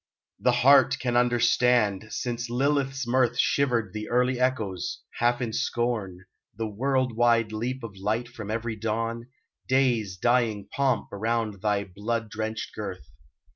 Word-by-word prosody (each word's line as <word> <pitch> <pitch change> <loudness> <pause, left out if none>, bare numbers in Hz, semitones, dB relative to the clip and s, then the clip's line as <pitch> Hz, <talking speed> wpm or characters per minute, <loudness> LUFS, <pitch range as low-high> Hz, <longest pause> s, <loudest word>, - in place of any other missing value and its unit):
The 125 - +3
heart 135 -2 +6
can 120 -1 -2
understand, 120 -3 +3
since 120 +1 -3
Lilith's 135 +1 0
mirth 120 -1 +2
Shivered 120 -8 +1
the 105 0 -5
early 125 +1 +2
echoes, 110 -8 -1 0.2
half 120 +1 +2
in 115 -3 -2
scorn, 105 -8 -2 0.3
The 115 - -2
world 130 +3 0
wide 115 -2 +3
leap 120 +4 -3
of 110 -4 -7
light 110 +5 -1
from 115 -4 -9
every 115 +1 -2
dawn, 115 +2 -3 0.4
Day's 120 -8 +1
dying 115 -2 +1
pomp 140 -5 0
around 110 -1 -2
thy 105 -1 +1
blood 105 +4 -4
drenched 110 0 -4
girth. 90 -9 -7
115 Hz, 135 wpm, -26 LUFS, 110-125 Hz, 0.4 s, heart